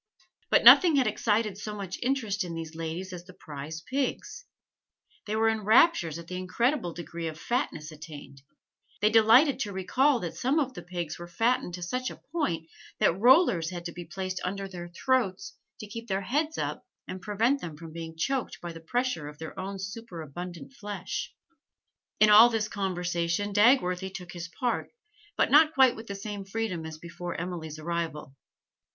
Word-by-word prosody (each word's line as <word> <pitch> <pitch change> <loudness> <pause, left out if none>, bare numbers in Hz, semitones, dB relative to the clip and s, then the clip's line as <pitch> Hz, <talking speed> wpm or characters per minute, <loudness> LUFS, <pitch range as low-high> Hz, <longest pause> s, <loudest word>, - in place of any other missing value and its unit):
But - - +4
nothing 345 -5 +9
had 265 -2 +4
excited 210 -1 0
so 210 0 -5
much 195 -3 -6
interest 235 -6 0
in 170 -2 -6
these 165 -1 -6
young 160 - -10
ladies 170 +3 -4
as 175 -1 -8
the 185 -1 -14
prize 150 +2 -7
pigs; 275 - -3 0.8
they 210 - -1
were 225 +1 +3
in 220 -1 +1
raptures 215 - +4
at 170 - -9
the 180 +2 -6
incredible 205 - 0
degree 170 0 -6
of 160 0 -6
fatness 170 - -2
attained; 150 -3 -11 0.6
they 210 +2 +3
delighted 230 +6 +6
to 210 -6 -2
recall 250 +8 +2
that 170 - -5
some 265 +5 0
of 275 -4 0
the 175 - -8
pigs 175 -2 -5
were 175 - -7
fattened 225 -1 0
to 180 - -7
such 255 +8 -2
a - - -9 0.2
point 175 - -1 0.3
that - - +3
rollers 210 - +4
had 175 -2 -7
to 170 - -4
be 175 +1 -8
placed 185 +3 -5
under 195 +1 -3
their 175 -2 -8
throats 195 0 0 0.3
to - - -6
keep 230 +3 -8
their 195 0 -1
heads 300 +10 -1
up - - -3 0.2
and 185 - -6
prevent 230 +8 +1
them 160 -3 -7
from 165 0 -10
being 165 -1 -7
choked 265 +9 -2
by 175 -1 -6
the 165 - -9
pressure 245 - -1
of 150 0 -10
their 160 0 -7
own 195 +1 -4
superabundant 180 - -7
flesh. 205 -5 -5 0.9
In 215 0 +6
all 220 +3 +9
this 220 -2 -1
conversation 180 0 -1
Dagworthy 195 -4 +4
took 180 -2 -8
his 175 0 -6
part, 240 +8 -2 0.5
but - - +2
not 310 +2 +6
quite 260 -2 +6
with 225 +1 -10
the 200 - -5
same 200 0 -6
freedom 195 -5 -3
as 160 -1 -8
before 170 +2 -7
Emily's 165 -3 -5
arrival. 155 -4 -4
190 Hz, 180 wpm, -28 LUFS, 170-230 Hz, 0.9 s, nothing